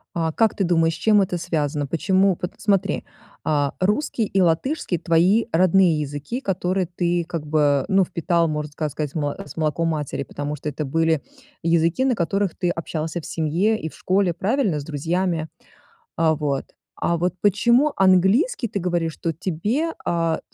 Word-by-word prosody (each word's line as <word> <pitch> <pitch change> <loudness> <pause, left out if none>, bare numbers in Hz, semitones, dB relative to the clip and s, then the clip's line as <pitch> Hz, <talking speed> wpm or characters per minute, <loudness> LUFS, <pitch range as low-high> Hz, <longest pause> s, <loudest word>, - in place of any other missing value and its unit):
А, 165 -1 0
как 225 +6 +2
ты 195 - +1
думаешь, 165 -2 +2
с - - -9
чем 210 +2 +4
это 180 -2 -2
связано? 150 -4 -1
Почему? 185 +6 +2
Пот 180 - -5
смотри, 200 -3 0 0.4
а, 145 -2 0
русский 215 +5 +1
и 195 -1 0
латышский- 180 - +1
твои 180 +7 +3
родные 180 -2 +4
языки, 145 - -4
которые 185 -4 -1
ты 175 -1 0
как 165 -4 -4
бы, 145 -3 +2
ну, 195 -1 +4
впитал, 170 -1 0
можно 150 -1 -3
ска 155 +1 -2
сказать, 150 0 -4
с 145 -2 -4
молоком 160 +1 0
матери, 150 -3 -3
потому 145 +2 -5
что 150 - -6
это 150 +1 -3
были 160 +2 +1 0.4
языки, 170 +7 +2
на 265 -2 +2
которых 195 +1 -1
ты 175 - 0
общался 165 0 -3
в - - -10
семье 175 +8 0
и 160 - -3
в - - -16
школе, 185 -2 +1
правильно? 195 - 0
С - - -8
друзьями. 160 +2 -1 0.7
А 160 -1 +2
вот. 145 -3 -2 0.3
А 170 - 0
вот 175 +1 0
почему 235 +8 +3
английский, 195 - +3
ты 200 - -3
говоришь, 170 -3 -1
что 165 - -3
тебе, 205 - -2
а, 165 -1 0
170 Hz, 170 wpm, -22 LUFS, 155-190 Hz, 0.7 s, чем